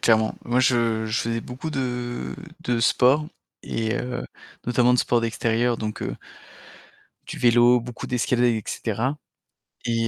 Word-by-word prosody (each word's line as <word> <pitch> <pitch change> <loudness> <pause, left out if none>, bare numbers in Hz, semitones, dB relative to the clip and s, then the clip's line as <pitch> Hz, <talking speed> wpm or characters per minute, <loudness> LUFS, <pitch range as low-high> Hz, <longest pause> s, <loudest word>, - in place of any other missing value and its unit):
clairement. 110 -1 +3
Moi, 120 +1 +1
je 115 -3 +2
je 110 +1 0
faisais 115 0 -1
beaucoup 130 +6 -6
de 120 - -3 0.3
de 120 -1 0
sport 130 +5 +4 0.4
et 110 0 -2
heu, 125 0 -3 0.4
notamment, 125 0 +4
de - - +2
sport 120 -1 +2
d'extérieur, 115 +1 0
donc 105 -1 -4
heu - - -3 1.1
du - - -6
vélo, 120 0 +5
beaucoup 120 +1 -7
d'escalade, 125 0 +1
et 115 -3 +2
cetera, 120 +6 -2 0.7
et 115 -1 0
120 Hz, 145 wpm, -24 LUFS, 115-125 Hz, 1.1 s, vélo